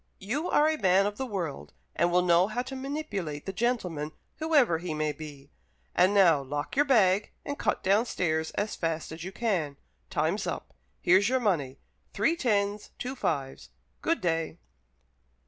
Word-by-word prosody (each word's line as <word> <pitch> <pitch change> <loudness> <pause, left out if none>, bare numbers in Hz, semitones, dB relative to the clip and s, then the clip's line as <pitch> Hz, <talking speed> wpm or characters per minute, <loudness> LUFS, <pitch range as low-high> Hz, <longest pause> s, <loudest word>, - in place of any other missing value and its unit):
You 275 - -3
are 300 - +4
a 315 -1 0
man 190 +1 +4
of 205 0 -2
the 265 - -3
world, 175 - -4 0.2
and 175 0 +2
will 180 +1 +4
know 175 +1 +4
how 240 +4 -2
to 265 +1 -7
manipulate 240 - -4
the 195 - -4
gentleman, 180 -9 -1 0.2
whoever 290 - +3
he 170 -2 -4
may 155 0 0
be. 145 -2 -10 0.4
And 185 +2 +4
now 180 -8 +5
lock 145 +2 -4
your 290 +2 +4
bag 210 -7 +4 0.2
and 285 0 -4
cut - - 0
downstairs 185 -6 +1
as 210 +1 -1
fast 165 -2 -2
as 160 0 -7
you 190 - -5
can. 180 -11 -1 0.3
Time's - - 0
up. - - -5 0.3
Here's 190 +4 +4
your 260 0 +2
money 160 - 0 0.4
three 330 - +2
tens, 205 -8 0
two 255 +2 -4
fives. 140 - -3 0.3
Good 330 - 0
day." 165 -2 -1
190 Hz, 165 wpm, -28 LUFS, 160-240 Hz, 0.4 s, now